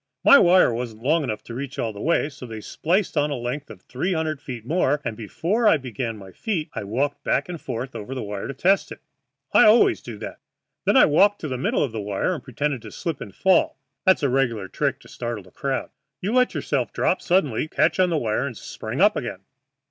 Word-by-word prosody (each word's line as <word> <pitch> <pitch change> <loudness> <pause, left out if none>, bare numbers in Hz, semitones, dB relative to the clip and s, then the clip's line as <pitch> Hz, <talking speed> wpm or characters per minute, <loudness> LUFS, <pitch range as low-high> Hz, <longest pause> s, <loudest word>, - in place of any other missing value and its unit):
My 280 - +9
wire 180 -7 +5
wasn't 115 -2 -5
long 155 +4 +2
enough 110 -5 -4
to 115 - -9
reach 135 +3 -6
all 110 -2 -2
the 100 - -9
way, 165 -3 +2
so 140 -4 -10
they 110 -1 -7
spliced 175 - -1
on 150 0 +2
a 145 - -2
length 125 +4 -4
of 95 - -12
three 180 +9 -2
hundred 155 -3 -2
feet 120 -6 -7
more, 150 -1 +1
and 115 -2 -2
before 170 - 0
I 165 - +6
began 120 -3 -4
my 95 -2 -11
feats 165 - -3
I - - -4
walked 135 +8 -2
back 140 - +1
and 175 -3 -7
forth 125 0 -5
over 115 +4 -6
the 130 - -3
wire 100 -1 -5
to 140 - -6
test 190 +8 +2
it. - - -9 0.5
I - - +7
always 220 +3 +5
do - - -8
that. - - -8 0.5
Then - - +4
I - - +8
walked 200 +7 +4
to 155 - -3
the 130 - -3
middle 125 - 0
of 135 - -2
the 110 -1 -4
wire 100 - -1
and 165 - -6
pretended 140 0 -2
to 110 -2 -10
slip 165 -4 -4
and 100 - -7
fall 190 -7 +3 0.3
that's 190 -5 +4
a 140 - +3
regular 120 -6 0
trick - - -1
to - - -16
startle 120 -4 -5
the 90 - -18
crowd. 135 -1 -3 0.3
You 200 +8 -2
let 250 0 +3
yourself - - -1
drop - - 0
suddenly, 155 - +1
catch 155 +4 +1
on 185 -1 +4
the 165 - +1
wire, 115 +1 0
and 120 -6 -7
spring 115 +9 -5
up 210 +2 +5
again. 120 -7 -4
135 Hz, 235 wpm, -23 LUFS, 115-165 Hz, 0.5 s, My